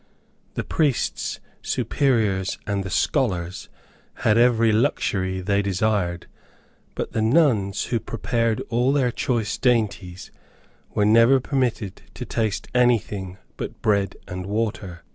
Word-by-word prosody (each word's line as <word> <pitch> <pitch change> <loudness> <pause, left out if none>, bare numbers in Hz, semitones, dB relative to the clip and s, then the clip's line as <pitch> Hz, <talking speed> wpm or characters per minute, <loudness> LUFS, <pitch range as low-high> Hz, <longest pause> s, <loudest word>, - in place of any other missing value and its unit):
The - - -2
priests, 145 -6 -1 0.2
superiors, 105 -9 0
and 100 -2 -1
the 95 - -5
scholars 90 -4 -1 0.6
had 105 - +5
every 115 -1 +4
luxury 100 -6 0
they 100 +2 +1
desired; 100 -3 0 0.7
but - - -3
the 110 - -1
nuns, 110 -6 +2
who 120 -2 -1
prepared 115 0 -1
all 125 +3 +2
their 130 -4 +2
choice 115 -4 -1
dainties, 105 -7 0 0.6
were 105 - +3
never 115 +5 +6
permitted 125 -7 -2
to - - -6
taste 110 -3 -2
anything 105 -7 +1 0.2
but - - -7
bread 100 -2 +1
and 90 +1 -6
water. 100 -5 -3
110 Hz, 120 wpm, -23 LUFS, 95-120 Hz, 0.7 s, never